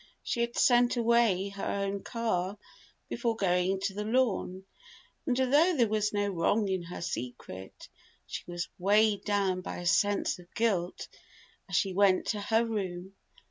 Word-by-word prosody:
She 235 - -1
had 235 0 -2
sent 245 0 +4
away 230 -5 +3
her 200 0 -8
own 200 0 -2
car, 205 -5 -2 0.5
before 230 -2 -1
going 185 -2 +1
to 195 0 -1
the 210 +1 -4
Lorne, 215 -5 0 0.6
and 250 -2 +1
though 295 +7 +3
there 235 -3 +4
was 210 -1 +1
no 205 -1 0
wrong 200 +4 +1
in 190 -2 -1
her 175 +1 -8
secret, 115 - -7 0.4
she - - -6
was 175 0 -4
weighed 205 +2 +3
down 195 -3 +1
by - - -6
a 175 - -7
sense 200 +3 +2
of 180 0 -16
guilt 190 -6 0 0.6
as 180 - -3
she 190 +2 +1
went 195 -1 +3
to 210 -2 -1
her 225 +3 +2
room. 190 -4 -4
200 Hz, 160 wpm, -30 LUFS, 185-225 Hz, 0.6 s, sent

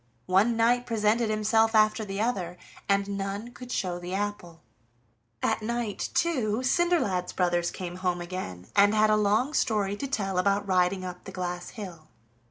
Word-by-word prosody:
One 205 +5 +3
knight 245 +2 +3
presented 225 0 +1
himself 220 +1 +2
after 215 +1 +4
the 195 -1 -5
other, 190 -6 -1 0.3
and 200 0 +1
none 200 +4 -4
could 250 0 -10
show 180 -5 -2
the 175 +1 -5
apple. 195 -5 -4 0.8
At - - +1
night, 235 -1 -2
too, 255 -9 +1
Cinderlad's 255 - +1
brothers 175 -1 +1
came 180 -1 -6
home 180 -1 -1
again 175 - -6
and 205 +1 +5
had 215 0 +4
a - - +5
long 215 +7 +2
story 210 -8 +1
to 275 - -3
tell 195 -8 -1
about 200 +2 +1
riding 185 0 +2
up 180 0 -8
the 195 - -7
glass 180 -1 -4
hill. 180 -8 -9
200 Hz, 165 wpm, -27 LUFS, 185-225 Hz, 0.8 s, and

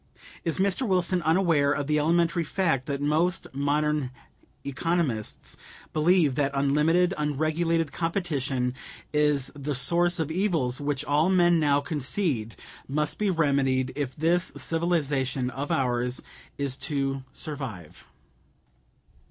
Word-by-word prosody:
Is 165 - -1
Mr. 195 +4 +1
Wilson 185 -1 +1
unaware 160 -3 +3
of 145 - -2
the 150 +1 +1
elementary 170 +2 +2
fact 160 -6 0
that 140 -1 -2
most 160 +5 +1
modern 145 0 0 0.6
economists 140 -5 -2 0.4
believe 155 -2 +3
that 140 +1 +1
unlimited, 150 +6 +3
unregulated 155 +2 0
competition 145 -8 -1 0.4
is 150 -3 +1
the 145 0 -3
source 175 +7 +2
of 160 -2 -2
evils 160 -9 0
which 145 0 -2
all 150 +5 +2
men 175 -2 +4
now 145 -2 +3
concede 145 - -2 0.3
must 150 +2 -1
be 210 -1 +1
remedied 140 -6 +1
if 140 -3 -3
this 170 +3 +1
civilization 140 -6 -1
of 140 +2 -5
ours 125 -1 0 0.3
is 140 -2 -2
to 135 -3 -2
survive? 130 - -6
150 Hz, 120 wpm, -26 LUFS, 135-170 Hz, 0.6 s, men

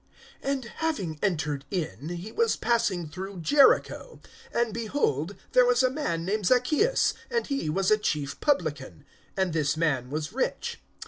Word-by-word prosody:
AND 275 -2 -2 0.2
having 195 - -2
entered 150 -7 -1
in, 160 -3 -4
he 175 +5 -6
was 460 0 +2
passing 210 -7 0
through 185 +3 -7
Jericho. 290 - +3 0.3
(2)And 235 -2 0
behold, 205 - -1 0.2
there 250 - +6
was 245 +1 +4
a 255 - +3
man 170 - -2
named 205 +1 -1
Zaccheus, 305 - +3 0.2
and 470 -1 0
he 275 - -2
was 190 +5 +1
a 215 - +5
chief 150 -8 -2
publican; 155 - -1 0.3
and 190 -3 +1
this 155 -2 +1
man 140 -7 0
was 155 +4 -4
rich. 260 - -2
190 Hz, 150 wpm, -27 LUFS, 155-255 Hz, 0.3 s, there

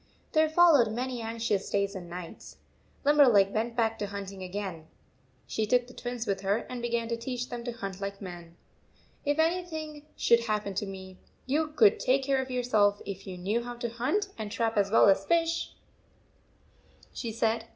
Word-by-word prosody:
There 315 0 +3
followed 315 -8 +5
many 250 +1 -3
anxious 225 -3 -2
days 200 0 0
and 180 -3 -8
nights. 175 -1 -9 0.5
Limberleg 250 -10 +6
went 230 +2 -1
back 225 -2 +1
to 205 - -2
hunting 195 -1 -7
again. 185 -4 -5 0.6
She 215 -1 -2
took 245 +2 +3
the 250 - -14
Twins 245 -2 -4
with 195 -3 -1
her, 200 +3 0
and 250 -1 -6
began 235 -1 -1
to 235 - 0
teach 245 +1 -4
them 240 -1 -5
to 240 - -2
hunt 195 -4 -6
like 200 0 -4
men. 175 -3 -9 0.7
"If 290 +1 +1
anything 320 -3 -1
should 235 0 +4
happen 210 -2 -1
to 205 +2 -2
me, 190 -1 -9 0.3
you 305 +4 +1
could 235 -9 +4
take 265 +2 +2
care 270 -1 +1
of 260 - -6
yourselves 220 -5 +2
if 195 -1 -7
you 185 -1 -6
knew 205 +6 -1
how 240 0 -6
to 235 0 -3
hunt 260 - -1
and 215 -1 -4
trap 225 0 0
as 200 -1 +2
well 220 - +6
as 195 0 +4
fish," 335 +4 0 1.4
she 230 - -4
said. 225 0 0
230 Hz, 180 wpm, -29 LUFS, 200-255 Hz, 1.4 s, Limberleg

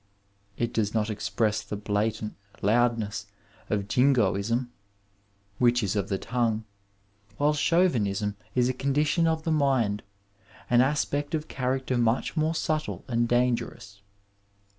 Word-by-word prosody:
It 120 - -1
does 105 -1 0
not 110 0 +1
eicpress 105 +1 -1
the - - -5
blatant 105 +1 -1 0.3
loudness 110 -1 +1 0.4
of 100 -2 -1
Jingoism, 120 -1 +2 0.9
which 120 -1 +3
is 100 +1 -1
of 100 - -1
the 95 - 0
tongue, 115 -1 -1 0.7
while 145 +1 +3
Chauvinism 115 - +1 0.2
is 125 -1 +3
a 130 - +1
condition 145 +5 +1
of 160 -1 0
the 160 - -1
mind, 130 -9 +2 0.7
an 120 0 +6
aspect 145 +2 0
of 155 0 -3
character 130 -1 -1
much 115 +6 +1
more 160 +1 +1
subtle 155 -1 -2
and 120 -2 +1
dan 125 0 +3
gerous. 100 -3 -9
120 Hz, 130 wpm, -27 LUFS, 105-140 Hz, 0.9 s, an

